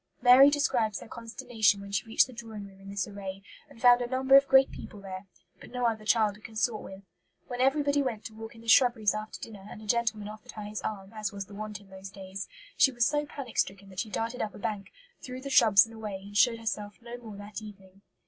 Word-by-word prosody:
Mary 255 +3 +8
describes 245 -8 +1
her - - -11
consternation 230 -3 0
when 200 0 -9
she 200 +3 -1
reached 225 - +4
the 255 - -13
drawing 225 -3 -8
room 195 -1 -15
in 195 - -11
this 200 -2 -2
array, 195 -1 -7 0.3
and - - -16
found 245 0 +6
"a 245 - -1
number 265 +1 +4
of 275 0 +7
great 265 0 +6
people" 205 - -9
there, 190 0 -8 0.3
but - - -12
no 250 -1 -2
other 220 -2 0
child 215 -2 +3
to 210 - -17
consort 220 0 -2
with. 195 +1 -10 0.4
When 245 0 -4
everybody 285 +1 +3
went 235 -6 -3
to 220 - -7
walk 225 +1 -9
in 225 - -13
the 230 - -15
shrubberies 230 -3 +5
after 215 0 -6
dinner, 205 -3 -10
and - - -9
a 215 - -11
gentleman 220 -1 0
offered 215 +3 -10
her 215 - -7
his 210 +1 -5
arm, 200 -1 -5
as 215 -1 -3
was 200 -1 -6
the 205 - -14
wont 210 -1 -6
in 200 -2 -19
those 190 0 -9
days, 190 0 -7 0.3
she 270 - +5
was 240 -2 +2
so 295 +2 0
panic 275 -5 -6
stricken 195 0 -1
that 185 -1 -8
she 220 - -2
darted 230 +3 -3
up 210 - -3
a - - -9
bank, 200 -1 -4 0.3
through 255 0 -7
the 275 +1 -6
shrubs 200 -6 +7
and 225 - -13
away, 210 -3 -6
and 205 0 -11
showed 230 +2 +4
herself 210 -2 -4
no 235 0 -8
more 220 -4 -10
that 205 +1 -8
evening. 195 -2 -13
215 Hz, 245 wpm, -29 LUFS, 200-245 Hz, 0.4 s, Mary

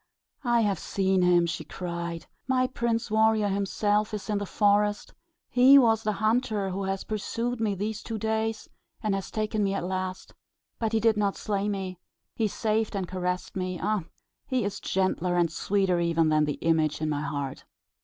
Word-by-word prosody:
"I 240 -2 +3
have 200 -5 +1
seen 190 -1 +1
him!" 175 -1 +4
she 170 - -3
cried. 170 -2 -5 0.2
"My 255 -1 +2
Prince 235 -3 -1
Warrior 220 -1 +3
is - - 0
himself 205 +2 0
in 210 0 -2
this 205 - -5
forest: 205 0 +2 0.3
he 255 +3 +7
was 225 -4 +4
the 215 -1 0
hunter 215 -2 0
who 195 +1 -3
has 195 0 -2
pursued 230 +3 -3
me 210 -3 +1
these 210 +2 -3
two 225 - -5
days, 220 +1 -1 0.4
and 210 -2 +1
has 195 -1 -3
taken 215 0 -1
me 195 0 0
at 195 - -2
last. 185 0 -4 0.5
But 225 -1 -1
he 225 - +3
did 225 -1 +3
not 200 -2 +1
slay 205 -1 -1
me: 190 -3 -4 0.4
he 225 - +1
saved 215 0 -1
and 190 -2 -2
caressed 180 0 -3
me. 185 -2 -3
Ah, 210 0 0 0.5
he 255 -3 0
is 200 0 -3
gentler 185 -2 0
and 170 -2 +2
sweeter 190 +1 +1
even 165 -2 +2
than 155 0 +3
the 150 - -1
image 160 -2 +2
in 155 - -1
my 145 -1 -1
heart." 145 -2 -4
200 Hz, 185 wpm, -27 LUFS, 180-220 Hz, 0.5 s, he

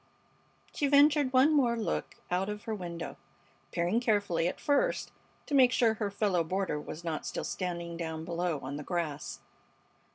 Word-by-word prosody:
She 285 - +1
ventured 290 -1 +5
one 265 +4 +5
more 245 -5 +3
look 220 - -2 0.2
out 185 +3 +1
of 210 0 -5
her 225 - -3
window, 170 -4 -5 0.5
peering 175 +7 +1
carefully 205 -8 +1
at - - -3
first 295 +13 +1 0.3
to - - -6
make 260 -3 +6
sure 235 -3 +3
her 215 -2 -2
fellow 200 -4 +1
boarder 185 -2 -1
was 160 +3 -8
not 160 -2 -3
still - - -4
standing 170 -2 -4
down 160 -1 -4
below 170 -2 -1
on 140 +2 -5
the 150 - -6
grass. 160 -4 -3
190 Hz, 165 wpm, -30 LUFS, 170-240 Hz, 0.5 s, make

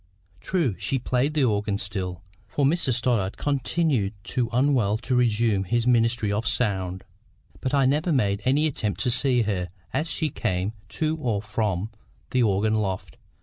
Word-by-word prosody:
True, 155 - 0
she 135 - 0
played 130 +4 0
the 150 - +3
organ 105 -3 +1
still, 95 -3 -4 0.2
for 140 +6 0
Mr 150 -2 +2
Stoddart 115 -5 0
continued 140 -6 0
too 120 -3 -1
unwell 120 -5 +2
to 125 +3 -3
resume 115 -4 +2
his 115 +4 0
ministry 115 -3 +2
of 105 +3 -1
sound, 95 -5 0 0.6
but 130 +2 -1
I 135 -1 +4
never 150 +6 +2
made 100 -8 +1
any 140 +4 +3
attempt 110 -9 -2
to 125 - +2
see 125 -1 +3
her 95 -4 -2 0.2
as 160 +2 -1
she 155 -3 -1
came 100 -3 -1 0.2
to 155 0 +1
or 125 -8 -1
went - - -18
from 105 -1 -1 0.4
the 130 - +2
organ 110 -1 +2
loft. 100 -4 -2
115 Hz, 165 wpm, -25 LUFS, 100-135 Hz, 0.6 s, I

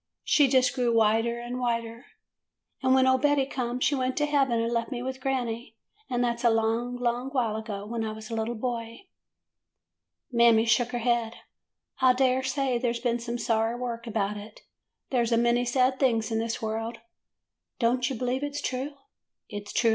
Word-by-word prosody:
She 290 -2 +4
just 255 -1 +3
grew 245 -3 +1
whiter 225 +2 +2
and 240 +1 -5
whiter, 230 0 -2 0.7
and 260 0 +4
when 260 0 +5
old 260 0 +3
Betty 290 -2 +3
come 250 -2 -3
she 290 - +2
went 255 -1 -1
to 295 - +2
heaven 275 -5 +2
and 230 +1 -1
left 230 -1 -1
me 245 -1 -3
with 260 0 -5
granny. 240 -4 -2 0.3
And 245 -1 0
that 235 -1 0
's - - -8
a 235 - +6
long, 225 +2 0
long 245 +1 -1
while 245 -6 0
ago, 215 -2 -5
when 225 +1 -3
I 220 - -2
was 220 +1 -9
a - - -3
little 225 +2 -2
boy.' 230 - -4 1.3
''Mammy 235 -1 +5
shook 230 +2 +3
her - - 0
head. 235 -2 +1 0.6
'I 255 -1 +5
dare 260 0 +2
say 265 -2 0
there 240 -1 0
's - - -4
been 240 0 0
some 235 0 -4
sorry 225 0 0
work 240 -1 -5
about 210 -2 -1
it. 210 +1 -11 0.5
There 250 -3 +2
's 235 - -2
a 230 - +4
many 240 +1 +2
sad 255 +1 +2
things 230 -4 +1
in 225 - +1
this 230 0 -3
world.' 225 +1 -3 0.4
" - - -61
'Don't 245 +2 +1
you 265 - -3
believe 250 +3 -1
it 290 0 -4
's 290 - -2
true? 265 +3 -3
240 Hz, 195 wpm, -27 LUFS, 230-255 Hz, 1.3 s, a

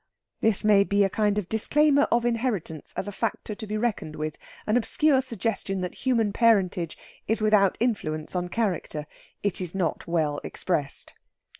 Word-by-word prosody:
This 220 -2 +2
may 205 -2 +6
be 200 0 +2
a 195 - +1
kind 210 0 +1
of 205 -4 -1
disclaimer 285 +7 +3
of 235 0 +2
inheritance 225 - -2
as 195 - -2
a - - -3
factor 220 +1 -3
to 215 +1 -7
be 215 +1 -2
reckoned 215 -9 -2
with, 155 0 -3 0.3
an 215 - +1
obscure 265 +3 +3
suggestion 225 -5 -3
that 180 - -3
human 230 -6 0
parentage 195 -7 +2 0.3
is 220 +2 +1
without 210 -3 +3
influence 155 -10 -2
on 180 0 -1
character. 180 -8 -2 0.4
It 200 -2 0
is 180 0 -4
not 185 -4 -1
well 155 -4 0
expressed. 150 -6 -2
205 Hz, 165 wpm, -26 LUFS, 180-230 Hz, 0.4 s, may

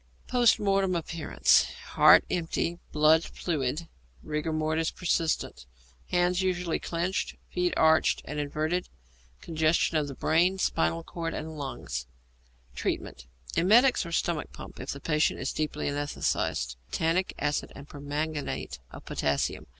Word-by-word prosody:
Post 245 -2 +4
Mortem 195 -2 +1
Appearances. 160 - +2 0.2
Heart - - +7
empty, 170 0 -1
blood 155 +2 +5
fluid, 155 -1 -3 0.4
rigor 150 +1 -2
mortis 155 +1 0
persistent. 160 - -1 0.4
Hands 180 +1 +2
usually 180 -3 0
clenched; 175 +3 -2 0.2
feet 180 0 +1
arched 160 0 +4
and 150 - -4
inverted. 155 +5 -1 0.5
Congestion 160 0 +1
of 145 -3 -3
brain, 175 +4 +3
spinal 80 - 0
cord, 165 -1 -4
and 160 0 -5
lungs. 100 - -5 0.7
Treatment. - - -4 0.3
Emetics 235 +9 +5
or 170 - -7
stomach 165 -2 -1
pump - - -11
if - - -7
the 140 - -4
patient 150 +2 +1
is 135 - -2
deeply 150 -1 -2
anæsthetized. 140 - -1
Tannic 165 +3 0
acid 145 0 -1
and 140 0 -10
permanganate 145 - -4
of - - -12
potassium. 70 -1 -1
160 Hz, 125 wpm, -28 LUFS, 145-175 Hz, 0.7 s, Heart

